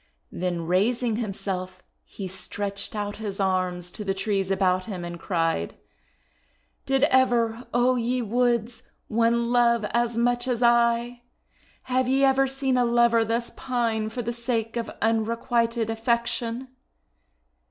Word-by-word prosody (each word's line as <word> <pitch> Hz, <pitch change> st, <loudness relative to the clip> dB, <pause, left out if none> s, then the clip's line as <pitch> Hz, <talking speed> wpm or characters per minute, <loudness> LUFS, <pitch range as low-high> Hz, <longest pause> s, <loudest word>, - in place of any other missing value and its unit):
Then 175 Hz, -2 st, -2 dB
raising 220 Hz, +6 st, +1 dB
himself, 185 Hz, -4 st, -4 dB, 0.2 s
he 195 Hz, -, -7 dB
stretched 200 Hz, +2 st, -5 dB
out 205 Hz, -1 st, -3 dB
his 205 Hz, -2 st, -5 dB
arms 185 Hz, -2 st, 0 dB
to 210 Hz, -, -7 dB
the 195 Hz, -1 st, -1 dB
trees 195 Hz, -1 st, -1 dB
about 185 Hz, -1 st, +1 dB
him, 185 Hz, -5 st, -5 dB
and 170 Hz, 0 st, -7 dB
cried: 165 Hz, -, -1 dB, 0.5 s
— -, -, -41 dB
"Did 270 Hz, 0 st, +2 dB
ever, 245 Hz, -4 st, +2 dB
O 245 Hz, +1 st, +3 dB
ye 245 Hz, +2 st, 0 dB
Woods, 235 Hz, 0 st, 0 dB, 0.3 s
one 235 Hz, +1 st, +2 dB
love 235 Hz, -2 st, +3 dB
as 235 Hz, 0 st, 0 dB
much 245 Hz, +1 st, +1 dB
as 245 Hz, -1 st, 0 dB
I! 235 Hz, 0 st, +3 dB, 0.6 s
Have 255 Hz, 0 st, 0 dB
ye 270 Hz, +1 st, +2 dB
ever 270 Hz, 0 st, +4 dB
seen 265 Hz, -1 st, 0 dB
a 250 Hz, -, +4 dB
lover 235 Hz, -1 st, +4 dB
thus 230 Hz, +2 st, -2 dB
pine 230 Hz, -4 st, -1 dB
for 245 Hz, +2 st, -4 dB
the 235 Hz, +2 st, -3 dB
sake 235 Hz, -1 st, -2 dB
of 235 Hz, -1 st, -2 dB
unrequited 230 Hz, +1 st, 0 dB
affection? 235 Hz, +2 st, -1 dB
230 Hz, 140 wpm, -25 LUFS, 200-240 Hz, 0.6 s, ever